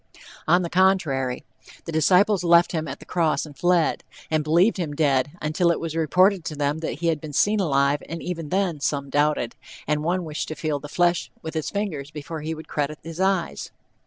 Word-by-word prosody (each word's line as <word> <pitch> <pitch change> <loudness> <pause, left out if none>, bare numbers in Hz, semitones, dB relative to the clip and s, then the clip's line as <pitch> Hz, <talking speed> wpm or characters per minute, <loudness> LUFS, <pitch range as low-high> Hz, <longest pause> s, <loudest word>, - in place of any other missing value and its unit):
On 175 +3 +4
the 170 - -3
contrary, 160 -9 +2 0.4
the 165 - -5
disciples 180 +5 +3
left 170 0 +5
him 160 -2 -2
at 135 - -5
the - - -14
cross 160 -4 0
and 150 -2 -12
fled, 175 0 +2 0.3
and 155 -1 +2
believed 170 +9 +3
him 160 -5 -3
dead, 145 -2 +1
until 155 +3 +1
it 170 - +1
was 165 -1 -4
reported 180 +4 +3
to 150 - -4
them 145 +1 -1
that 160 -2 -5
he 170 - 0
had 155 -3 -1
been 155 -2 -8
seen 210 +8 +3
alive, 140 -4 +2
and 165 +1 -4
even 165 -4 -5
then 185 -4 0
"some 140 -1 -2
doubted," 145 -5 +1 0.3
and 150 0 0
one 180 +3 0
wished 155 -1 -4
to 155 - -5
feel 155 -4 -2
the 145 +1 -9
flesh 175 +1 +1
with 160 - -5
his 160 -2 -2
fingers 175 -9 -3
before 150 +1 -7
he 160 +2 -3
would 160 - -10
credit 150 +1 -2
his 165 +1 -8
eyes. 190 -2 0
160 Hz, 210 wpm, -24 LUFS, 150-175 Hz, 0.4 s, left